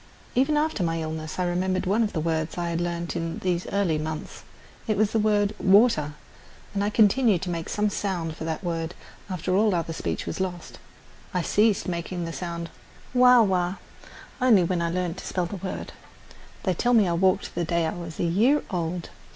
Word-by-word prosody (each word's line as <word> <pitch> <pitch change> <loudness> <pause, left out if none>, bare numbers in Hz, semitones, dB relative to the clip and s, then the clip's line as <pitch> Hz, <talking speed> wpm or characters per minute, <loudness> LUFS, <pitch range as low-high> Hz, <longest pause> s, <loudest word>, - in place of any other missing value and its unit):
Even 275 +4 +2
after 305 -7 0
my 165 -1 0
illness 155 0 -5
I 185 - +1
remembered 185 +2 0
one 200 +5 +2
of 215 -2 +1
the 160 - -1
words 160 0 -1
I 170 -1 -1
had 170 +1 -1
learned 170 0 -3
in 165 -1 -3
these 180 -1 -1
early 185 -6 +1
months. 155 0 -5 0.5
It 215 -2 +1
was 215 0 +2
the 225 - +1
word 210 -1 +2
"water," 190 -7 +4 0.6
and 200 0 0
I 205 - +1
continued 215 -2 +4
to 180 - -2
make 165 -1 -4
some 210 0 +1
sound 175 -6 -2
for 160 - -7
that 160 +2 -3
word 165 -1 -3 0.3
after 185 0 -1
all 210 -1 +3
other 165 -1 -2
speech - - -3
was - - -4
lost. 180 -2 -4 0.6
I 180 - +1
ceased 210 +3 +2
making 175 0 -3
the 165 - -5
sound 170 -1 -5 0.4
"wah 250 -1 +7
wah" 185 -2 +1 0.7
only 230 -8 +6
when 175 0 0
I 170 - 0
learned 180 0 -2
to - - -7
spell 180 -2 -1
the 195 +3 -5
word. 190 +1 -6 0.7
They 185 - +1
tell 245 +7 +2
me 210 -4 +5
I 170 - +1
walked 190 +3 +1
the 170 - -1
day 170 0 +1
I 160 - -1
was 170 -2 -8
a - - +1
year 220 - +3
old. 175 -1 -3
180 Hz, 200 wpm, -25 LUFS, 170-205 Hz, 0.7 s, wah